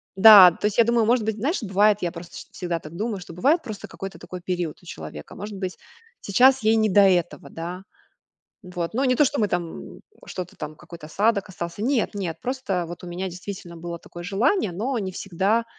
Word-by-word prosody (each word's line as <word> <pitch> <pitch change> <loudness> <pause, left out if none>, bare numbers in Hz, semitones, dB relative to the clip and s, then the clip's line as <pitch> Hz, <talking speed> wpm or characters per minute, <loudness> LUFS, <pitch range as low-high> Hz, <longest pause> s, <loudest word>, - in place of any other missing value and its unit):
Да, 195 -3 +10
то 185 - -6
есть, 210 +1 0
я - - +8
думаю, 235 -1 +2
может 235 -1 +2
быть, 220 -1 -1
знаешь, 280 - -1
бывает, 205 +1 +3
я 175 -1 -1
просто 170 -1 -10
шт - - -10
всегда 175 -2 -3
так 155 +2 -11
думаю, 210 0 -3
что 175 -2 -10
бывает 290 - +2
просто 215 -5 -8
какой-то 195 0 -8
такой 180 -1 -8
период 175 -3 -3
у - - -20
человека, 80 - -9
может 205 +1 -7
быть, 185 -1 -4 0.4
сейчас 255 +5 +4
ей 220 +1 +4
не 220 -1 +2
до 200 +1 +5
этого, 180 -3 +2
да? 175 +3 -6 0.8
Вот, 180 +1 -5
ну, 265 +3 +1
не 255 - +3
то, 295 - +5
что 285 +2 -1
мы 210 -2 +2
там 175 - -1 0.3
м, - - -16 0.2
что-то 185 -2 -7
там, 150 0 -7
какой-то 170 -1 -11
осадок 200 +4 +1
остался, 170 +3 -6
нет, 250 -3 0
нет, 175 -5 -4
просто 220 -9 -2
вот 175 +2 -9
у - - -8
меня 180 +2 -4
действительно 180 -1 -8
было 170 0 -6
такое 175 +1 -11
желание. 200 - +1
Но 235 +7 -2
не 190 -2 -4
всегда, 195 +5 0
195 Hz, 215 wpm, -24 LUFS, 175-220 Hz, 0.8 s, Да